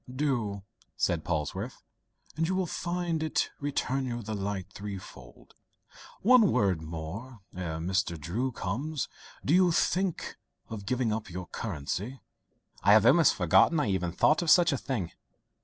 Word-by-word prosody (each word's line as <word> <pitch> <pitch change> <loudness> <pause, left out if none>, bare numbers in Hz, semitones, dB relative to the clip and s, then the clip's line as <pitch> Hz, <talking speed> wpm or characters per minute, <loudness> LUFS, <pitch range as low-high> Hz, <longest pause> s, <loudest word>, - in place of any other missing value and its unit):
"Do," 120 -8 -1 0.3
said 80 -2 +1
Polwarth, 80 -3 -3 0.5
"and 165 +2 0
you 185 - 0
will 185 -1 +1
find 175 -1 -2
it 155 - 0
return 135 -2 -1
you 120 -1 -4
the 110 +1 -4
light 100 -1 -4
threefold. 95 -11 -9 0.7
One 230 -2 +6
word 100 -9 +2
more, 85 +10 -7
ere 85 -3 -3
Mr. 85 0 -1
Drew 110 - -2
comes: 130 +9 -3 0.4
do 145 - +2
you 180 -1 +5
still - - +2
think 190 -4 -3 0.3
of 105 -3 -7
giving 125 -3 +1
up 110 -1 -4
your 90 +1 -6
curacy?" 100 - -4 0.6
"I 100 - +6
have 110 0 +6
almost 165 +5 +6
forgotten 95 - +4
I 115 -9 +1
ever 90 -2 0
thought 150 - +3
of 170 - -1
such 170 +1 +6
a - - 0
thing. 100 -11 -3
110 Hz, 155 wpm, -29 LUFS, 95-150 Hz, 0.7 s, One